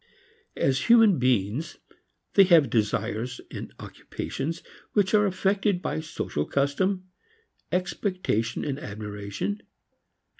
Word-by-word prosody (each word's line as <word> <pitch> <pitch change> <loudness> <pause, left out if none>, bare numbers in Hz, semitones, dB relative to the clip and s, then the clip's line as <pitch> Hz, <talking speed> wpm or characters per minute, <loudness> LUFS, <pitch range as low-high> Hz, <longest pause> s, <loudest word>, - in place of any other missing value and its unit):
As 135 0 +1
human 225 - +7
beings 125 - 0 0.6
they 195 - +7
have 165 - +5
desires 110 +2 -1
and - - -7
occupations 165 +4 -5 0.3
which 200 -2 +2
are 210 -1 +5
affected 195 0 +1
by 175 - -2
social 155 - -3
custom, 185 +7 0 0.6
expectation 180 - -1
and 140 -1 -2
admiration. 105 - -5
155 Hz, 100 wpm, -26 LUFS, 115-190 Hz, 0.6 s, human